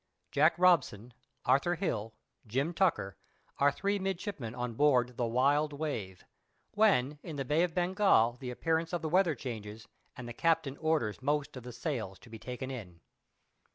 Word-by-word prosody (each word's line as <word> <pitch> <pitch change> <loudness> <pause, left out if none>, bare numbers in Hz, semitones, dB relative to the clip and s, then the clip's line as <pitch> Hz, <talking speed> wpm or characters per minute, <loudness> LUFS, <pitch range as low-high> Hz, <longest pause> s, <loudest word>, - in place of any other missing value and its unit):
"* - - -49
[Jack - - +4
Robson, 130 - +3 0.3
Arthur 140 +7 +3
Hill, 115 - -3 0.3
Jim 135 +10 -1
Tucker, 105 - +1 0.4
are 145 +1 +5
three 200 +6 -1
midshipmen 190 - -4
on 125 -1 -3
board 125 -2 +3
the 120 - -1
Wild 140 +5 +2
Wave. 115 - -4 0.5
When 150 -10 +2
in 165 -4 -7
the 135 -1 -3
Bay 150 +5 +2
of 175 -2 0
Bengal 180 - +3
the 130 - -5
appearance 160 +6 -1
of 175 - -2
the 160 - -1
weather 180 -2 +3
changes, 110 -4 -7 0.3
and 125 - -7
the 120 - -6
captain 155 -1 +1
orders 155 -10 0
most 145 +1 -1
of 130 - -7
the 125 +1 -8
sails 115 - -4
to 115 - -17
be 110 - -8
taken 125 +3 -6
in. 95 -10 -8
140 Hz, 170 wpm, -31 LUFS, 120-165 Hz, 0.5 s, are